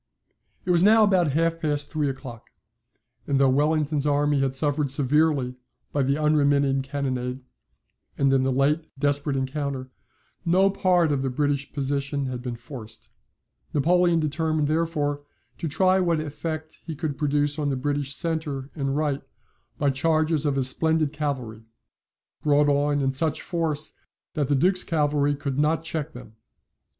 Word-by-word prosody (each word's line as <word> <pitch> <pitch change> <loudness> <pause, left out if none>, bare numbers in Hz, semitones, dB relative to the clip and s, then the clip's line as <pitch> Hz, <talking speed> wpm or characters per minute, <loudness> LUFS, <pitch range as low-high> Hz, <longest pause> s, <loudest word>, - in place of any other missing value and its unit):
It 180 - +1
was 170 -1 +4
now 215 +3 +6
about 180 -8 +3
half 165 +2 +1
past 145 -2 -2
three 150 -3 0
o'clock; 130 -3 -8 0.8
and 140 -1 +1
though 135 -1 +5
Wellington's 150 +1 +1
army 145 0 +2
had 135 -1 0
suffered 145 0 +1
severely 140 -1 +1 0.4
by 145 - 0
the 135 +2 +1
unremitting 145 -3 +2
cannonade, 130 -2 -3 0.8
and 135 -1 +3
in 135 - +4
the 130 0 +1
late 150 +5 +1
desperate 145 0 0
encounter, 135 -1 -3 0.5
no 185 +3 +3
part 180 -4 +2
of 140 -2 0
the 135 - -1
British 145 +1 -1
position 140 0 -2
had 125 -1 -4
been 125 -1 -4
forced. 115 -3 -10 0.7
Napoleon 175 +3 +3
determined 155 0 0
therefore 155 -2 -1 0.4
to 165 - -2
try 185 +5 +3
what 170 -3 +1
effect 155 +1 -5
he 160 - -6
could 145 -1 -3
produce 145 +1 0
on 145 -1 0
the 135 - 0
British 140 +1 -1
centre 150 -5 -2
and 135 -1 -2
right 145 -2 0 0.6
by 145 -2 +2
charges 155 +2 +1
of 140 - +1
his 135 -2 +2
splendid 160 +2 +1
cavalry, 130 -7 -4 0.8
brought 145 0 +3
on 145 0 +1
in 135 -1 +1
such 150 +3 0
force 160 -4 -3 0.4
that 145 -3 -1
the 145 - +2
Duke's 185 +6 +2
cavalry 145 -3 +1
could 140 -1 -3
not 155 +2 +1
check 160 -1 -4
them. 115 -3 -12
145 Hz, 155 wpm, -25 LUFS, 135-155 Hz, 0.8 s, now